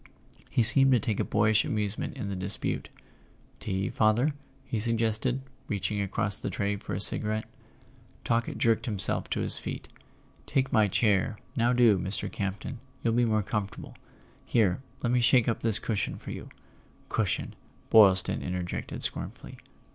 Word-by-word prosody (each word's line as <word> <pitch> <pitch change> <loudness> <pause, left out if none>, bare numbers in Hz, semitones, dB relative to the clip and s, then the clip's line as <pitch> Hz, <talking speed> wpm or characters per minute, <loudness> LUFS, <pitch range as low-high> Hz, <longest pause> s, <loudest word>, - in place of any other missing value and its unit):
He 120 - +2
seemed 135 +4 +6
to 125 - +4
take 105 -1 -2
a - - +2
boy¬ 105 +1 +2
ish 110 0 +3
amusement 105 -1 -3
in 100 - -4
the 100 - -3
dispute. 95 +2 -3 0.7
"Tea, 95 -1 -2
father?" 115 +7 +2 0.3
he 115 - -3
sug¬ 115 +2 0
gested, 115 +3 0 0.3
reaching 100 -1 -2
across 100 0 0
the - - -3
tray 100 0 -1
for 105 -1 -6
a - - -2
cigarette. 110 +2 +3 0.8
Talkett 115 0 0
jerked 115 0 +1
himself 100 -4 0
to - - -1
his - - +2
feet. - - -6 0.6
"Take 130 -1 0
my 110 -2 +4
chair, 105 0 +1 0.2
now 120 -1 +2
do, 120 -6 +4
Mr. 95 +2 -4
Campton. 100 +5 -4 0.2
You'll 115 - +1
be 120 +1 +3
more 110 -2 +1
comfortable. 105 -1 -4 0.5
Here, 105 -3 +1 0.2
let 120 - +1
me 125 0 +3
shake 120 0 +4
up 115 - -1
this 110 -2 +2
cushion 110 -4 -2
for - - -8
you - - -8 0.3
" - - -31
("Cushion!" - - -1 0.4
Boylston 95 -4 +5
interjected 90 -1 -4
scornfully.) - - -4
110 Hz, 160 wpm, -28 LUFS, 100-115 Hz, 0.8 s, seemed